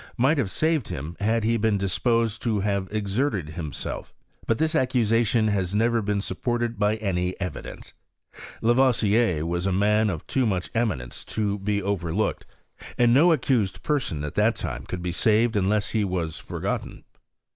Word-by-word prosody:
ici^iit 135 +6 +3
hsive 115 -8 0
saved 155 +1 0
him 75 +5 -5
had 110 +2 +1
he 115 +1 +2
l>ef^n 110 -1 +2
6\s\^jvA 115 +3 0
Xfj 110 -5 -1
have 100 -2 0
exerted 105 - -1
himself. 80 -2 -6 0.3
But 115 - +2
dui - - +1
arx'<j«ation 115 -5 +2
ha.9 95 -2 -1
never 115 +2 +2
been 105 0 -1
snppDited 120 +3 -2
by 105 0 +2
any 90 -4 -1
efi 90 -2 -4
dtuf'^. - - -10 0.7
Lavoisier 115 - +3
was 85 +2 -1
a - - +1
man 105 +3 +3
ot 85 -6 -5
too 130 -3 +1
mach 95 -4 -2
eminence 105 - -2
to 105 -2 -2
\m: 100 -1 +1
overlooked, 100 +1 -1 0.5
and 120 -1 +4
no 160 +7 +6
accused 125 -11 +1
person 130 - -1
at 75 - -4
diafc - - +2
time - - -5
could 90 -1 -5
be 90 - -1
saved 110 +5 +2
unless 105 +1 +1
he 110 -2 +1
was 90 -5 -2
forgotten. - - -4
105 Hz, 165 wpm, -25 LUFS, 95-115 Hz, 0.7 s, no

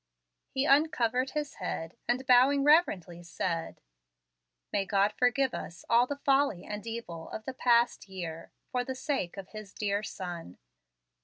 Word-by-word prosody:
He 265 +1 0
uncovered 265 -4 +3
his 295 -1 -3
head, 165 +1 -4
and, 250 +3 0
bowing 260 +3 +5
reverently, 200 - +3
said, 170 -1 -3 0.9
"May 200 - +2
God 200 +1 +2
forgive 250 +2 +2
us 170 - -7
all 240 +2 +5
the 285 - -3
folly 275 -9 +2
and 210 +1 -6
evil 200 -8 -6
of 220 - -7
the 265 - -4
past 240 -4 +2
year, 170 -4 -6 0.2
for 250 -1 0
the 260 +1 -5
sake 255 - -2
of 195 -1 -8
His 215 -2 -10
dear 205 -1 0
Son." 175 - -7
230 Hz, 150 wpm, -30 LUFS, 185-265 Hz, 0.9 s, bowing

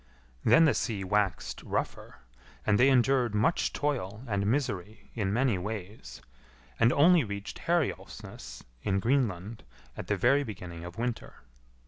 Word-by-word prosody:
Then 165 0 +6
the 155 - +4
sea 105 -6 -2
waxed 95 -2 -1
rougher, - - -4 0.4
and 100 - +3
they 130 +2 +6
endured 125 -3 +3
much 135 +11 +2
toil 120 -7 -2
and 100 -2 -1
misery 110 -5 -2
in 100 -4 -1
many 120 -3 +1
ways, 95 - -7 0.6
and 115 - +5
only 165 +3 +5
reached 100 -2 -6
Herjolfsnes, 135 - -3 0.2
in 95 +7 0
Greenland, 115 -4 -1 0.3
at - - -7
the - - 0
very 140 +4 +3
beginning 90 -7 -8
of 90 +1 -9
winter. 120 - -4
110 Hz, 135 wpm, -29 LUFS, 95-130 Hz, 0.6 s, Then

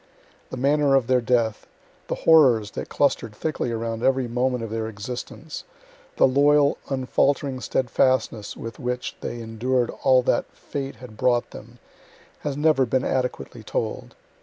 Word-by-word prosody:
The - - -6
manner 140 +1 +3
of 135 -3 +3
their 130 0 +2
death, 115 -3 0 0.4
the - - -2
horrors 125 -10 +5
that - - -6
cluster'd 115 -6 0
thickly 155 -2 -2
around 115 0 -3
every 130 0 +2
moment 125 0 0
of 115 - -6
their 110 0 -2
existence, 120 +8 -7 0.5
the - - +6
loyal, 145 +2 +4
unfaltering 135 0 0
steadfastness 120 -4 0
with 115 +4 -7
which 125 -1 -3
they 120 - -5
endured 120 +2 -1
all 130 -1 +5
that 120 - 0
fate 140 -1 -5
had 120 -4 -12
brought 120 +1 +1
them, 120 +3 -12 0.6
has 145 -2 -4
never 150 -4 +3
been 130 +3 0
adequately 125 -2 -2
told. 110 0 -4
125 Hz, 145 wpm, -24 LUFS, 115-135 Hz, 0.6 s, the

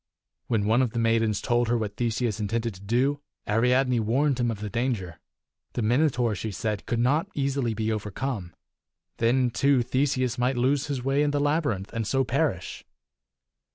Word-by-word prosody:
When 110 -4 +1
one 110 +4 +3
of 125 -4 0
the 115 - -1
maidens 115 -2 +2
told 120 0 +1
her 120 +1 +2
what 105 -2 -3
Theseus 115 -2 -1
intended 115 +2 -1
to 95 - -14
do, 130 +8 +1 0.3
Ariadne 125 +3 +2
warned 130 +5 +1
him 120 -1 +1
of 110 -3 -3
the 105 - -4
danger. 105 -7 -2 0.5
The 120 - -2
Minotaur, 125 -1 +2
she 105 +3 -4
said, 105 +1 -3
could 120 - 0
not 145 +10 +2
easily 135 -5 0
be 110 +1 -1
overcome. 105 -3 -4 0.6
Then, 125 +2 +2
too, 140 -1 +3
Theseus 130 0 0
might 125 +1 +1
lose 135 +3 +1
his 135 -4 -3
way 135 +2 +2
in 150 - +2
the 145 0 0
labyrinth, 145 - 0
and 115 -2 -2
so 135 +2 +2
perish. 125 - -1
120 Hz, 175 wpm, -26 LUFS, 110-135 Hz, 0.6 s, one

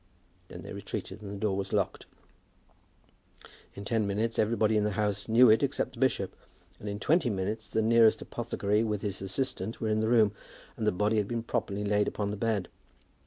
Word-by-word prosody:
Then - - -10
they - - -8
retreated 100 +3 -6
and 100 - -7
the 100 - -5
door 100 -2 0
was 100 0 -3
locked. 100 -3 -1 1.7
In 100 - -8
ten 110 -1 0
minutes 110 +3 -1
everybody 110 0 +2
in 105 - +3
the 105 -1 0
house 105 -1 -1
knew 115 +1 +7
it 110 - +4
except 140 -1 -1
the 120 - -12
bishop; 120 -7 0 0.4
and 105 - -6
in 100 0 -4
twenty 160 -1 +2
minutes 105 +2 -3
the 110 - 0
nearest 115 0 +5
apothecary 105 +2 -1
with 105 -2 -2
his 100 -2 -3
assistant 100 +1 -3
were 110 - -1
in 110 0 +1
the 110 - +1
room, 110 -4 +5 0.4
and 110 - -2
the - - +5
body 105 +4 +1
had 105 -2 +1
been 115 0 -3
properly 105 -3 -2
laid 105 0 +2
upon 100 -1 -2
the - - -3
bed. 105 -3 -1
105 Hz, 200 wpm, -29 LUFS, 100-115 Hz, 1.7 s, knew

